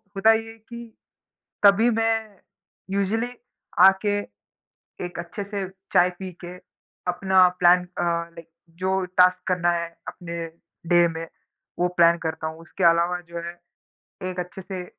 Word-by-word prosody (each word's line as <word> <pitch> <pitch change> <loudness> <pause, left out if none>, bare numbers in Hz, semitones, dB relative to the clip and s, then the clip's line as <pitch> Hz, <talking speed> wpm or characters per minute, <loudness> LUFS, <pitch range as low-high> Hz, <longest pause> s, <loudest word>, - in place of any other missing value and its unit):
होता 220 +3 +5
ये 225 0 -3
है 225 - -16
कि 235 +2 -10 0.8
कभी 205 +4 +6
मैं 225 -2 -1 0.5
यूज़ुअली 200 +5 0 0.6
आके, 205 +2 +1 0.9
एक 175 - -7
अच्छे 175 +4 -5
से 200 -2 -4 0.3
चाय 180 +1 +5
पी 190 -1 -6
के 175 +1 -7 0.5
अपना 185 0 +4
प्लान 180 +1 +5
अ, 180 0 -7
लाइक 170 -1 -3 0.3
जो 190 0 +1
टास्क 180 0 +3
करना 180 -1 +2
है 170 -1 -1 0.2
अपने 170 -1 -6 0.4
डे 175 -1 +5
में, 165 0 -6 0.5
वो 180 - +3
प्लान 170 0 +6
करता 160 0 -3
हूँ। 160 +1 -7
उसके 175 +2 -6
अलावा 170 +2 +1
जो 170 - -7
है, 170 +1 -6 0.8
एक 180 - -5
अच्छे 180 +2 -6
से 185 -1 -6
180 Hz, 145 wpm, -24 LUFS, 170-200 Hz, 0.9 s, कभी